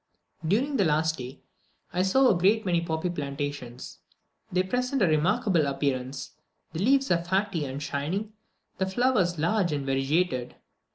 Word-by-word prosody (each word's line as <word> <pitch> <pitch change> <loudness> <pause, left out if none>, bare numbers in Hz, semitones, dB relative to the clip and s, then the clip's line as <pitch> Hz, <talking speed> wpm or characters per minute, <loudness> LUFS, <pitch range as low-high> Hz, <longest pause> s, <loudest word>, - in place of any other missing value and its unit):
During 250 - +1
the 200 - +3
last 160 -1 +1
day 130 +2 -8 0.5
I 180 - +1
saw 260 +8 +4
a 205 - +4
great 200 +5 +3
many 175 -2 +2
poppy 165 +1 -2
plantations. 140 -5 -5 0.5
They 185 +1 +2
present 250 +4 0
a - - +4
remarkable 170 +1 +2
appearance; 135 -1 -2 0.4
the 160 - -4
leaves 270 +5 +3
are 170 -1 +2
fatty 190 -3 0
and 135 +2 -5
shining, 180 +10 -3 0.5
the 190 - +1
flowers 190 -5 +1
large 175 +3 +1
and 145 -2 -2
variegated. 135 0 0
170 Hz, 150 wpm, -27 LUFS, 145-200 Hz, 0.5 s, saw